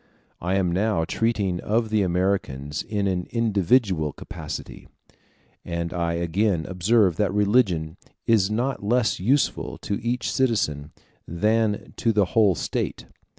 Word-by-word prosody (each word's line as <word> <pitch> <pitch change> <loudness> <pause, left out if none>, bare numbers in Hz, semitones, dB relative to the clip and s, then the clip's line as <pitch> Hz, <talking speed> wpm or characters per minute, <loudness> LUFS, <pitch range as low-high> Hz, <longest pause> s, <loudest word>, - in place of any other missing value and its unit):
I 90 +2 0
am 95 -3 +1
now 95 -2 +1
treating 100 -4 0
of 110 +3 0
the 110 -1 +3
Americans 90 -7 -1
in 105 -2 -2
an 90 -2 -1
individual 100 - +1
capacity, - - -8 0.8
and 85 -1 -3
I 85 -1 -1
again 85 +1 0
observe 95 -1 +2
that 105 -2 +1
religion 100 -6 +1 0.3
is 110 -4 +3
not 120 +3 -1
less 115 +1 +1
useful 125 +8 0
to 100 +3 -3
each 120 0 -1
citizen 80 - 0 0.4
than 105 +4 0
to 115 - +2
the 105 -2 +3
whole 105 -5 +4
State. - - -3
100 Hz, 130 wpm, -24 LUFS, 85-110 Hz, 0.8 s, whole